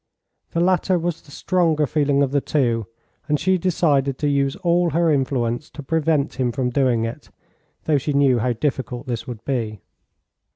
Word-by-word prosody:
The 170 - 0
latter 185 +1 +2
was 170 -1 -3
the - - -21
stronger 160 -1 +1
feeling 145 -1 +1
of 135 - -1
the 140 0 +1
two, 120 -8 0 0.4
and 150 -1 +1
she 185 +2 +2
decided 145 -7 +1
to 150 - -1
use 140 -1 +1
all 175 -2 +1
her 165 +1 +2
influence 130 -1 -1
to 145 - -9
prevent 155 -1 0
him 125 -2 +1
from 125 +1 -1
doing 120 -4 +2
it, 115 - -7 0.5
though 150 -3 +2
she 150 - -2
knew 140 -3 +3
how 125 +2 0
difficult 125 -1 -3
this 120 -3 -4
would 115 -3 -8
be. 115 -6 -2
140 Hz, 175 wpm, -22 LUFS, 125-160 Hz, 0.5 s, knew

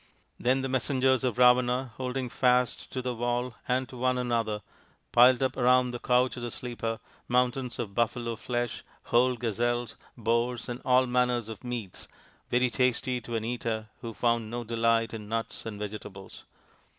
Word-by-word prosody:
Then 130 +2 +2
the - - 0
messengers 130 0 +1
of 125 -2 0
Ravana, 125 0 +4
holding 130 0 -2
fast 125 0 +1
to 130 - -3
the 125 0 -1
wall 120 +1 -1
and 130 +1 +1
to 130 - -10
one 125 +1 +1
another, 115 -4 -1 0.5
piled 125 +2 +6
up 130 0 0
around 125 0 +4
the 120 - -5
couch 125 +1 +2
of - - -5
the 120 - -3
sleeper 115 -2 -4 0.3
mountains 125 0 +1
of 110 -5 -4
buffalo 115 +1 0
flesh, 120 +1 -3 0.2
whole 125 +1 +3
gazelles, 120 0 -1 0.2
boars, 115 +2 0
and 125 0 -5
all 130 0 +4
manner 125 0 +2
of 110 -1 -7
meats 120 -6 -6 0.4
very 125 0 +2
tasty 125 0 +1
to 120 +1 -5
an 110 -1 -2
eater 115 -2 -3
who 115 - -5
found 115 -1 0
no 120 +1 -4
delight 115 0 +1
in 105 -2 -7
nuts 115 0 -3
and 105 -2 -5
vegetables. 105 -2 -8
120 Hz, 165 wpm, -28 LUFS, 115-125 Hz, 0.5 s, piled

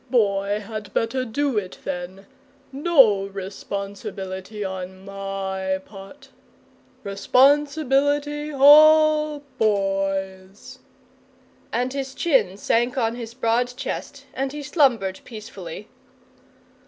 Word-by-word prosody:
Boy 205 -4 +1
had 215 -1 -7
better 255 +3 0
do 255 0 0
it 185 -2 -9
then! 185 +1 -6 0.5
No 270 - +4
responsibility 195 0 -6
on 190 0 -7
my 195 -1 -3
part. 215 +8 -13 0.7
Responsibility 285 +6 +2
all 305 +1 +6 0.2
Boy's!" 195 -2 -2 0.9
And 250 +2 -1
his 270 -1 -5
chin 235 - +1
sank 240 +5 0
on 230 -2 +1
his 235 -1 -8
broad 245 +1 0
chest - - -6
and 270 0 -2
he 295 0 -7
slumbered 245 - +1
peacefully. 235 - -9
225 Hz, 90 wpm, -23 LUFS, 195-275 Hz, 0.9 s, all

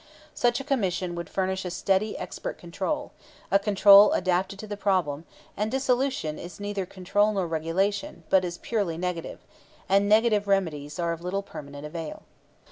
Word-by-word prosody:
Such 240 +1 +1
a - - -5
Commission 190 -10 -1
would 170 0 -6
furnish 190 0 -1
a 180 - -3
steady 195 +4 0
expert 180 - -6
control, 190 - -3 0.4
a 195 - +5
control 200 0 +7
adapted 185 +2 0
to 215 - -7
the 210 -1 -5
problem; 180 -7 0 0.3
and 210 +1 -1
dissolution 260 - 0
is 175 +1 -9
neither 205 -2 -3
control 205 +3 +1
nor 195 -3 0
regulation, 170 +3 -1
but 190 -1 +5
is 175 -1 -4
purely 200 -8 -2
negative; 180 -1 -4 0.4
and 200 +1 +3
negative 215 -1 +4
remedies 160 -7 0
are 170 -1 0
of 165 0 -5
little 190 +3 -2
permanent 145 -5 -9
avail. 160 0 -6
190 Hz, 160 wpm, -26 LUFS, 170-205 Hz, 0.4 s, control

